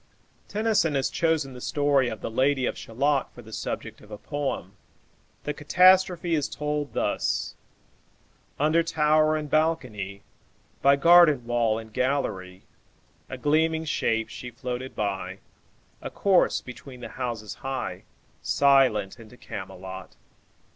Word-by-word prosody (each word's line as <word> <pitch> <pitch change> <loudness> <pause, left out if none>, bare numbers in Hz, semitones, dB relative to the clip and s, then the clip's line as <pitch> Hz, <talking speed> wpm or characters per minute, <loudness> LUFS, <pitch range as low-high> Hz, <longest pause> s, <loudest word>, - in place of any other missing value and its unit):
Tennyson 210 -8 +1
has 135 -1 0
chosen 160 -5 0
the 125 - -10
story 145 -3 +2
of 110 - -7
the - - -4
"Lady 130 +2 +2
of - - -2
Shalott" 140 +4 -1
for 120 - -11
the 110 0 -13
subject - - -5
of 105 - -16
a 105 - -7
poem. 135 - -4 0.7
The 150 - -2
catastrophe 180 +2 +4
is 150 -3 0
told 150 -1 -3
thus: - - -1 1.1
"Under 155 +3 +3
tower 155 -1 +2
and 155 -1 -3
balcony, 125 -11 -1 0.6
By 140 +1 +6
garden 155 -4 +6
wall 120 -2 +1
and 110 -1 -9
gallery, 95 -9 -2 0.7
A 130 - -6
gleaming 160 +4 +1
shape 115 -7 0
she 125 - -8
floated 125 +1 -6
by, 95 -2 -3 0.6
A - - -5
corse 195 -3 +2
between 125 0 -11
the - - -7
houses 120 -5 -5
high, 135 0 -4 0.4
Silent 130 -7 +3
into 115 +2 -14
Camelot. 95 -2 -8
135 Hz, 130 wpm, -26 LUFS, 115-155 Hz, 1.1 s, By